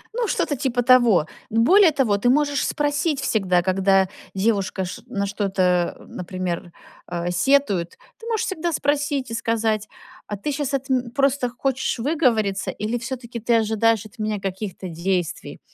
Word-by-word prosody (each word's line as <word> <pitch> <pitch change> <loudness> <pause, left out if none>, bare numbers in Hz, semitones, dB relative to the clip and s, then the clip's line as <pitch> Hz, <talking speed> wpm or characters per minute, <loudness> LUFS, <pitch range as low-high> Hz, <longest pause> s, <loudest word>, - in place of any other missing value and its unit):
Ну, 480 -1 0
что-то 305 -5 0
типа 250 -2 -1
того. 240 -9 +5 0.2
Более 325 - +5
того, 255 -8 +1
ты 245 +5 +1
можешь 285 +1 +2
спросить 290 0 0
всегда, 190 -9 +1
когда 190 +1 +3 0.3
девушка 195 -2 0
ш 185 +6 -7
на 200 -5 -2
что-то, 195 -1 -1 0.4
а, - - -15
например, 180 -1 -5 0.4
а, 175 0 -3
сетует, 195 -3 +1 0.2
ты 455 - -10
можешь 450 -2 0
всегда 345 -3 -2
спросить 285 -4 0
и - - -3
сказать: 225 -2 0 0.4
"А 205 - -4
ты 295 +10 -3
щас 285 -1 -2
от 270 +1 -4
м 255 -2 +1
просто 275 -1 +1
хочешь 265 +2 -1
выговориться, 230 -8 +1
или 220 +3 -2
всё-таки 235 0 -6
ты 235 +1 +2
ожидаешь 225 -1 +2
от 220 +3 -15
меня 215 -1 -1
каких-то 190 0 -5
действий?" 175 0 -3
230 Hz, 155 wpm, -22 LUFS, 195-275 Hz, 0.4 s, того